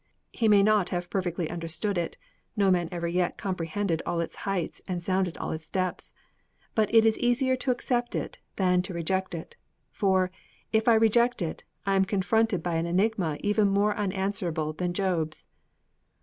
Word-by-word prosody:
He 225 - +1
may 205 -2 +6
not 210 -3 +3
have 175 0 -3
perfectly 175 -3 -1
understood 170 +4 -2
it 170 -2 -2 0.4
no 200 -2 +4
man 175 -2 +1
ever 170 -1 -2
yet 175 +1 0
comprehended 180 -1 -2
all 170 - -2
its 170 - -3
heights 185 -4 -2
and 180 -2 -3
sounded 185 -1 0
all - - -3
its 160 0 -6
depths! 185 -2 -2 0.6
But 215 -2 +1
it 225 -1 +6
is 220 -1 +3
easier 255 +2 +2
to 260 - -3
accept 245 -1 0
it - - -4 0.2
than 180 -2 +3
to 180 0 -5
reject 185 +2 -1
it. 165 - -8 0.3
For, 190 -3 +2 0.4
if 220 +1 +2
I 230 - +7
reject 225 0 +3
it, 160 - -5 0.2
I 195 0 +2
am 190 0 +4
confronted 200 -1 +1
by 170 -2 0
an 165 +1 -1
enigma 185 -3 +1
even 205 0 +3
more 200 +1 +2
unanswerable 190 -6 -1
than 175 +3 -2
Job's. 175 -4 -1
190 Hz, 175 wpm, -27 LUFS, 175-210 Hz, 0.6 s, I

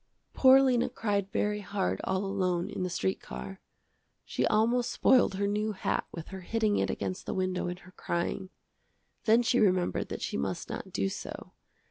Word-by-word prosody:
Poor 265 0 +7
Lena 250 -3 +2
cried 200 -3 -1
very 210 0 0
hard 180 - -2
all 190 +1 0
alone 185 -3 -1
in - - -4
the 180 - -1
street 190 +2 -1
car. 195 0 -8 0.6
She - - 0
almost 235 +3 +2
spoiled 250 -7 +4
her 200 +1 0
new 210 +1 0
hat 195 - -1
with 165 -2 -8
her 190 -1 -7
hitting 215 +2 +1
it - - 0
against 185 - -4
the - - -2
window 185 -1 -1
in 180 0 -4
her 185 - -14
crying. 185 +2 -3 0.8
Then 230 +2 +5
she 250 +1 +2
remembered 185 -4 +2
that - - -5
she - - -2
must 70 - -3
not - - -6
do 95 - 0
so. - - -7
195 Hz, 180 wpm, -30 LUFS, 185-220 Hz, 0.8 s, Poor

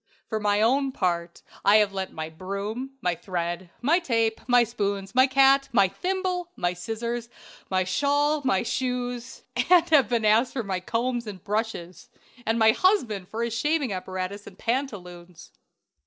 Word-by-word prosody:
"For 220 - -3
my 205 0 +1
own 270 +4 +2
part, 170 -6 -2 0.2
I 200 - +5
have 210 -2 +4
lent 190 -1 -4
my 160 0 -5
broom, 200 +10 -5
my 180 - +1
thread, 175 0 -4
my 325 +7 +4
tape, 230 -8 0
my 245 -1 +5
spoons, 200 -4 -3
my 260 +1 +5
cat, 275 +1 +4
my 200 -5 +4
thimble, 365 - -2
my 175 0 -1
scissors, 235 +5 -4 0.4
my 185 -1 +1
shawl, 290 +9 +1
my 195 -8 +2
shoes, 245 0 -3 0.3
and 360 -2 +6
have 275 -8 +5
been 235 -3 +1
asked 225 +4 +3
for 245 - -2
my 190 -2 -2
combs 235 +4 -2
and 190 -4 -8
brushes, 205 -5 -4 0.4
and 225 +1 +2
my 220 -1 +6
husband 230 - +1
for 225 +4 -3
his 235 -1 -2
shaving 290 -1 0
apparatus 185 +2 -5
and - - -12
pantaloons." 180 - -4
225 Hz, 160 wpm, -26 LUFS, 190-260 Hz, 0.4 s, and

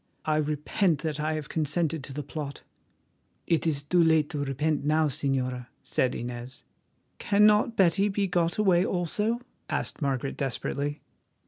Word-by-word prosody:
I 155 -1 +2
repent 150 +2 0
that 155 -2 -2
I 155 +1 0
have 155 -2 -4
consented 160 0 -1
to - - -8
the 145 +2 -4
plot." 145 -1 -6 0.8
"It 165 0 +1
is 145 -3 0
too 175 +4 +3
late 160 -2 +3
to 145 -2 -2
repent 145 +2 -1
now, 155 +1 +3
Señora," 130 -2 -1 0.2
said 130 - 0
Inez. 120 +1 -6 0.6
"Cannot 210 +2 +4
Betty 195 +2 +4
be 200 0 0
got 175 -2 0
away 185 -4 +4
also?" 210 +6 -1 0.3
asked - - -2
Margaret 135 -1 -1
desperately. 140 +2 -2
155 Hz, 145 wpm, -27 LUFS, 140-175 Hz, 0.8 s, Cannot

